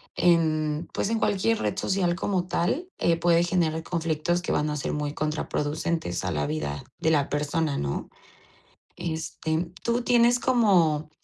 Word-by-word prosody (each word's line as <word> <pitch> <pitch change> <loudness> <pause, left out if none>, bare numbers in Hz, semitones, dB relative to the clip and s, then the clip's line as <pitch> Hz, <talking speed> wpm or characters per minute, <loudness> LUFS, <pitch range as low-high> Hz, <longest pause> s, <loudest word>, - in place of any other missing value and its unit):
en 155 -2 +2
pues, 200 - -1
en 225 - +1
cualquier 215 +3 +1
red - - -1
social 180 -3 +1
como 185 -1 -1
tal 270 - 0
eh, 170 -1 +2
puede 170 0 +3
generar 165 -3 0
conflictos 170 0 -1
que 180 - -3
van 150 - +1
a 150 - -2
ser - - -3
muy 150 -1 -2
contraproducentes 155 - -2
a - - -1
la 75 0 -1
vida 75 -1 -3 0.2
de 160 - +1
la 145 -3 +2
persona, 150 0 -1
¿no? 70 0 -3 0.9
Este, 160 0 -3
tú 235 +1 +1
tienes 240 0 +4
como 175 -12 +3
165 Hz, 155 wpm, -26 LUFS, 150-180 Hz, 0.9 s, tienes